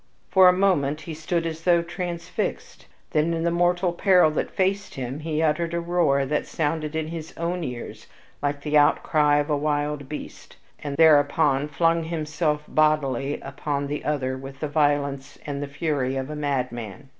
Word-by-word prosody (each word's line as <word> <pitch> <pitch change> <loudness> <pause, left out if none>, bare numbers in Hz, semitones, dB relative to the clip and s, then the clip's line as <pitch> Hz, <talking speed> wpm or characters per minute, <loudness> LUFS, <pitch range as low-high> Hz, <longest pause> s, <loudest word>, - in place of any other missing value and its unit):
For 185 -1 +7
a - - +7
moment 175 -6 +1
he 165 - -7
stood 165 +2 -2
as 165 -1 -4
though 170 -1 +4
transfixed; 170 0 -5 0.2
then 160 +2 +1
in 165 - -2
the 170 - +1
mortal 175 +1 +1
peril 180 -3 +4
that 150 - -2
faced 195 +1 -1
him, 130 +2 -4
he 155 0 -1
uttered 165 +2 0
a - - 0
roar 170 -5 +1
that 150 +2 -1
sounded 155 0 -2
in 160 0 -2
his 160 -1 -7
own 170 +1 -2
ears 125 -5 -7 0.3
like 145 0 -1
the 150 +1 -2
outcry 145 0 +3
of 145 +1 0
a - - +3
wild 145 -1 -1
beast, 150 - -9 0.3
and 140 -1 -4
thereupon 145 -2 +4
flung 165 +3 +1
himself 155 -2 -1
bodily 145 -3 +1
upon 140 +1 -3
the 145 +1 -4
other 130 -3 -1
with 135 +1 -10
the 155 - -2
violence 145 -2 0
and 140 -1 -4
the 145 - -3
fury 140 -3 -1
of 135 +2 -3
a - - -5
madman. 130 -4 -3
150 Hz, 175 wpm, -24 LUFS, 140-165 Hz, 0.3 s, For